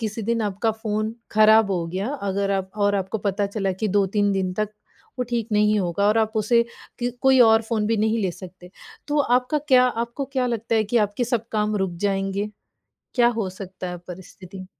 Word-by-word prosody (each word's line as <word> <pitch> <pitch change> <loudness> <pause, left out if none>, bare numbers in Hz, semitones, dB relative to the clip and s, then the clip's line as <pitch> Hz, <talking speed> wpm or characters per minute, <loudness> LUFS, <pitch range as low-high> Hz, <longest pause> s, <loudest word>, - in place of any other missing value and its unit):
किसी 220 0 -3
दिन 230 +1 0
आपका 205 +2 0
फ़ोन 215 0 -3 0.2
ख़राब 215 -1 +5
हो 175 -3 -1
गया 190 +6 -3 0.2
अगर 200 +1 -1
आप 190 -1 -2
और 205 -1 +2
आपको 195 +2 -2
पता 200 0 -1
चला 200 -1 -2
कि 210 +4 -2
2-3 205 +1 +1
दिन 190 -2 -1
तक 215 0 -1 0.5
वो - - +1
ठीक 230 -1 -1
नहीं 210 0 +3
होगा 180 +3 0
और 215 +2 +3
आप 220 0 +1
उसे 235 +2 +3 0.4
कि 245 0 -1
कोई 265 -1 +5
और 225 -1 +6
फ़ोन 220 -2 -1
भी 225 - +1
नहीं 220 +2 +1
ले 185 - 0
सकते। 180 0 -12 0.4
तो 295 0 +1
आपका 250 +2 +2
क्या 255 -1 +6
आपको 235 +3 -3
क्या 260 -2 +1
लगता 230 -1 -2
है 220 - +3
कि 215 +4 -1
आपके 205 +5 -3
सब 235 -1 -2
काम 210 -1 0
रुक 190 -3 -1
जाएँगे? 195 +1 -1 0.6
क्या 240 -2 +5
हो 225 -5 -2
सकता 190 -1 -8
है 180 - -6
परिस्थिति? 185 +1 -10
210 Hz, 205 wpm, -23 LUFS, 195-230 Hz, 0.6 s, और